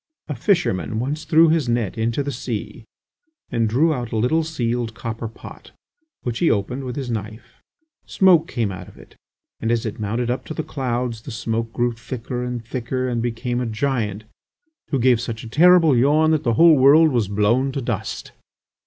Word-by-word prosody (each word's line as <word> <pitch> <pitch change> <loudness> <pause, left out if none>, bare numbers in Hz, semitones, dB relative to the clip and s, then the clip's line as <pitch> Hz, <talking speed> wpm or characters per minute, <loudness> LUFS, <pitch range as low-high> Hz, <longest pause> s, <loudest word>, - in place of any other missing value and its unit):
"A 150 - -3
fisherman 115 - 0
once 145 +7 -3
threw 160 0 +5
his 155 -6 +1
net 115 -5 -1
into 115 +4 -1
the 140 - -3
sea 115 -3 -6 0.7
and 115 -2 +1
drew 155 +8 +3
out 120 -4 -5
a 115 - -1
little, 140 +9 +2
sealed, 120 -7 -2
copper 115 0 -5
pot, 110 - -13 0.5
which 120 -1 -3
he 170 - +3
opened 125 +6 -1
with 125 -1 -5
his 130 -4 -4
knife. 110 +1 -7 0.5
Smoke 180 -4 +4
came 115 -5 -2
out 90 - -8
of - - -16
it, - - -17 0.4
and 115 - -1
as 120 -1 0
it 110 - -5
mounted 115 +3 -1
up 125 - -3
to 155 - -7
the 160 - -2
clouds 125 -6 -3
the - - -10
smoke 115 0 -3
grew 120 +1 0
thicker 120 +1 -6
and 125 -2 -5
thicker 130 +2 -3
and 120 -2 -1
became 120 +1 -2
a 125 - -2
giant 110 -3 -2 0.7
who 140 - 0
gave 125 -2 +3
such 115 -2 -5
a - - -8
terrible 165 +2 +5
yawn 150 +6 +3
that 155 -2 +2
the 115 - +1
whole 165 +3 +6
world 150 +4 +6
was 120 -6 +1
blown 105 +7 +1
to 135 - -3
dust...." 125 - -4
120 Hz, 190 wpm, -21 LUFS, 115-140 Hz, 0.7 s, whole